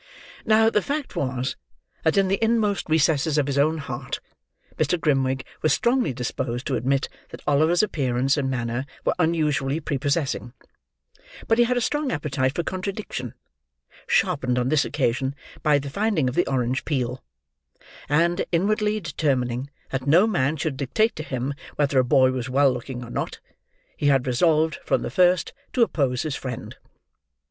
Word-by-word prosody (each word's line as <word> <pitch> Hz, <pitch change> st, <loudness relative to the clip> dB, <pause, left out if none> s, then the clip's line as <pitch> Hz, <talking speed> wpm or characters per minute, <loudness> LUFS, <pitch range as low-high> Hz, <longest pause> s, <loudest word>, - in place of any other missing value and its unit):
Now, 220 Hz, +1 st, +4 dB
the 210 Hz, -, +2 dB
fact 285 Hz, +5 st, -3 dB
was, 130 Hz, -1 st, -2 dB, 0.5 s
that 160 Hz, +3 st, +2 dB
in 195 Hz, -1 st, +4 dB
the 195 Hz, +3 st, 0 dB
inmost 220 Hz, -5 st, +1 dB
recesses 155 Hz, -1 st, +2 dB
of 145 Hz, -, +3 dB
his 140 Hz, 0 st, 0 dB
own 155 Hz, +3 st, +3 dB
heart, 135 Hz, -3 st, -5 dB, 0.6 s
Mr. 155 Hz, +3 st, +1 dB
Grimwig 135 Hz, -4 st, +1 dB, 0.2 s
was 155 Hz, -3 st, +3 dB
strongly 240 Hz, -, +2 dB
disposed 125 Hz, 0 st, -3 dB
to 135 Hz, -, 0 dB
admit 135 Hz, +3 st, 0 dB, 0.2 s
that -, -, -11 dB
Oliver's 155 Hz, +6 st, +3 dB
appearance 135 Hz, -7 st, +1 dB
and 140 Hz, -2 st, -1 dB
manner 125 Hz, +1 st, -2 dB, 0.2 s
were -, -, +3 dB
unusually 155 Hz, -4 st, +1 dB
prepossessing; 140 Hz, -, -1 dB, 0.9 s
but 225 Hz, +1 st, +3 dB
he 240 Hz, -, +6 dB
had 250 Hz, +1 st, 0 dB
a -, -, +1 dB
strong 295 Hz, +3 st, 0 dB
appetite 140 Hz, -3 st, -1 dB
for 170 Hz, -, -1 dB
contradiction, 185 Hz, -, -4 dB, 0.7 s
sharpened 125 Hz, -1 st, +1 dB
on 125 Hz, +1 st, +1 dB
this 150 Hz, -1 st, +3 dB
occasion 130 Hz, 0 st, -1 dB, 0.3 s
by 150 Hz, -2 st, +4 dB
the 140 Hz, 0 st, -5 dB
finding 200 Hz, -6 st, +1 dB
of 125 Hz, -, -1 dB
the 175 Hz, -, +1 dB
orange 130 Hz, 0 st, 0 dB
peel; 125 Hz, -4 st, -2 dB, 0.9 s
and, 170 Hz, +5 st, +2 dB
inwardly 210 Hz, +4 st, +1 dB
determining 135 Hz, -, -1 dB, 0.2 s
that 135 Hz, 0 st, -3 dB
no 170 Hz, +8 st, +6 dB
man 155 Hz, -8 st, +1 dB
should 140 Hz, -2 st, -2 dB
dictate 145 Hz, -, +1 dB
to -, -, -5 dB
him 130 Hz, -2 st, -3 dB, 0.2 s
whether 140 Hz, -2 st, +2 dB
a -, -, +4 dB
boy 130 Hz, +1 st, +4 dB
was 130 Hz, -1 st, -3 dB
well 135 Hz, 0 st, +4 dB
looking 125 Hz, 0 st, -6 dB
or 120 Hz, -, -9 dB
not, -, -, -3 dB, 0.6 s
he 145 Hz, -, 0 dB
had 135 Hz, -3 st, +3 dB
resolved, 155 Hz, +5 st, +2 dB
from -, -, 0 dB
the -, -, -4 dB
first, 180 Hz, -2 st, +3 dB, 0.2 s
to 245 Hz, -, +3 dB
oppose 135 Hz, -, 0 dB
his 155 Hz, -3 st, -3 dB
friend. 125 Hz, -3 st, -6 dB
145 Hz, 165 wpm, -24 LUFS, 130-170 Hz, 0.9 s, he